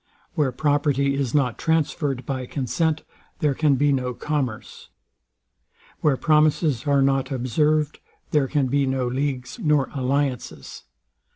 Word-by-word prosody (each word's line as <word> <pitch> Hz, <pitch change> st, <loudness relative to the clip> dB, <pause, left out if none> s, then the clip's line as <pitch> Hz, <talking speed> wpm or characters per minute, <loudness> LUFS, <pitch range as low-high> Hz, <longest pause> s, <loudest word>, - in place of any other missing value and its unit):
Where 145 Hz, -4 st, +1 dB
property 140 Hz, 0 st, +1 dB
is 135 Hz, -3 st, -1 dB
not 125 Hz, -5 st, +1 dB
transferred 145 Hz, -5 st, 0 dB
by 130 Hz, -1 st, -3 dB
consent, 155 Hz, +4 st, -1 dB, 0.3 s
there 150 Hz, -5 st, +1 dB
can 150 Hz, 0 st, +2 dB
be 145 Hz, +2 st, +2 dB
no 125 Hz, -2 st, -1 dB
commerce. 135 Hz, -7 st, -4 dB, 1.1 s
Where 145 Hz, -4 st, +2 dB
promises 155 Hz, -2 st, +2 dB
are 140 Hz, -1 st, +4 dB
not 135 Hz, -1 st, +1 dB
observed, 150 Hz, +4 st, 0 dB, 0.3 s
there 145 Hz, -3 st, +2 dB
can 145 Hz, -1 st, +1 dB
be 140 Hz, +2 st, +1 dB
no 130 Hz, -1 st, 0 dB
leagues 130 Hz, -1 st, -3 dB
nor 150 Hz, -4 st, +1 dB
alliances. 135 Hz, -, -2 dB
140 Hz, 125 wpm, -23 LUFS, 130-150 Hz, 1.1 s, are